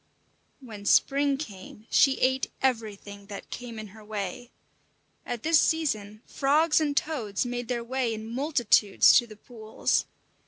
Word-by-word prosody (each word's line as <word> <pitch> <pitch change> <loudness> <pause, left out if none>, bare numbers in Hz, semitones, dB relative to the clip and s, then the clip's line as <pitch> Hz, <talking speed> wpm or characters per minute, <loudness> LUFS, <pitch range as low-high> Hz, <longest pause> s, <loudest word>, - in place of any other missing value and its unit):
When 215 -5 -10
spring 280 +4 +3
came 210 -5 -9
she 270 -1 +4
ate 260 +1 +1
everything 205 -5 -3
that 200 -1 -9
came 240 -2 -7
in 215 -1 -7
her 215 +2 -15
way. 210 +3 -5 0.8
At 240 -2 -4
this 320 0 +4
season 215 -10 -1
frogs 305 +4 +2
and 290 -2 -1
toads 235 -10 -1
made 245 -1 -4
their 240 -1 -2
way 255 0 -1
in 220 0 -5
multitudes 240 -4 +3
to 240 - -5
the 215 - -12
pools. 220 0 -2
240 Hz, 145 wpm, -27 LUFS, 215-270 Hz, 0.8 s, she